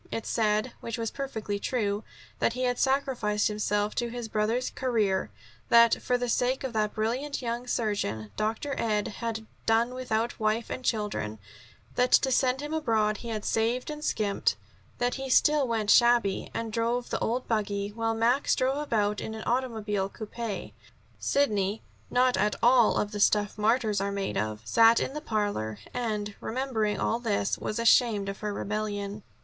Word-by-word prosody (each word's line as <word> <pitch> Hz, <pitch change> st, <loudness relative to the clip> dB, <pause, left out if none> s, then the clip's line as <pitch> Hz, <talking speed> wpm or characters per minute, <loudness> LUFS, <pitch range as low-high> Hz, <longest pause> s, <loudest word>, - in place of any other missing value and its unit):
It 225 Hz, -, -4 dB
said 215 Hz, +2 st, +1 dB
which 230 Hz, 0 st, -5 dB
was 225 Hz, -1 st, -2 dB
perfectly 220 Hz, -7 st, -4 dB
true 210 Hz, -2 st, -1 dB, 0.4 s
that 230 Hz, -, +2 dB
he 255 Hz, +1 st, -3 dB
had 245 Hz, -1 st, 0 dB
sacrificed 260 Hz, -7 st, +1 dB
himself 210 Hz, 0 st, 0 dB
to 240 Hz, -1 st, -1 dB
his 240 Hz, -1 st, -5 dB
brother's 220 Hz, +4 st, 0 dB
career: 215 Hz, -, 0 dB, 0.4 s
that, 235 Hz, 0 st, +6 dB
for 250 Hz, -, +1 dB
the 245 Hz, 0 st, -2 dB
sake 250 Hz, +3 st, +1 dB
of 260 Hz, -2 st, -3 dB
that 215 Hz, -1 st, 0 dB
brilliant 250 Hz, +7 st, -1 dB
young 240 Hz, +1 st, -3 dB
surgeon, 155 Hz, -, -2 dB
Dr. 225 Hz, +7 st, -2 dB
Ed 210 Hz, -2 st, 0 dB
had 225 Hz, -2 st, -3 dB, 0.2 s
done 230 Hz, +2 st, +3 dB
without 240 Hz, -2 st, -2 dB
wife 220 Hz, +1 st, 0 dB
and 255 Hz, -, -4 dB
children; 210 Hz, -, -1 dB, 0.6 s
that 250 Hz, 0 st, +3 dB
to 265 Hz, -, +5 dB
send 255 Hz, +1 st, +2 dB
him 295 Hz, +1 st, -5 dB
abroad 220 Hz, -8 st, +1 dB
he 235 Hz, -, -7 dB
had 215 Hz, -2 st, -4 dB
saved 235 Hz, +5 st, 0 dB
and 300 Hz, 0 st, -7 dB
skimped; 210 Hz, -8 st, 0 dB, 0.4 s
that 245 Hz, 0 st, 0 dB
he 270 Hz, -, -4 dB
still 295 Hz, +1 st, +4 dB
went 220 Hz, -3 st, +1 dB
shabby 235 Hz, -5 st, +4 dB
and 225 Hz, -1 st, -4 dB
drove 235 Hz, +2 st, -1 dB
the -, -, 0 dB
old 250 Hz, +3 st, -1 dB
buggy, 205 Hz, -2 st, -1 dB
while 225 Hz, +1 st, -1 dB
Max 240 Hz, +5 st, +2 dB
drove 265 Hz, +2 st, +1 dB
about 210 Hz, -8 st, 0 dB
in 220 Hz, -, -5 dB
an 220 Hz, -, -6 dB
automobile 220 Hz, -6 st, -1 dB
coupe. 220 Hz, 0 st, -6 dB, 0.5 s
Sidney, 210 Hz, -7 st, +1 dB, 0.3 s
not 250 Hz, 0 st, +3 dB
at 210 Hz, 0 st, +1 dB
all 240 Hz, -1 st, +5 dB
of 210 Hz, -, -1 dB
the 205 Hz, -, -4 dB
stuff 205 Hz, 0 st, +3 dB
martyrs 215 Hz, -1 st, +1 dB
are 200 Hz, 0 st, -1 dB
made 200 Hz, -1 st, -3 dB
of, 105 Hz, 0 st, -2 dB
sat 230 Hz, 0 st, +5 dB
in -, -, -1 dB
the 280 Hz, -, -7 dB
scented 310 Hz, -, -21 dB
parlor 205 Hz, -, -1 dB, 0.2 s
and, 215 Hz, -4 st, -2 dB
remembering 225 Hz, -4 st, -1 dB
all 230 Hz, -, 0 dB
this, 210 Hz, -4 st, -1 dB
was 215 Hz, -, -3 dB
ashamed 230 Hz, -3 st, +4 dB
of 195 Hz, -, -6 dB
her 210 Hz, -1 st, -3 dB
rebellion. 205 Hz, 0 st, -3 dB
225 Hz, 175 wpm, -28 LUFS, 210-245 Hz, 0.6 s, that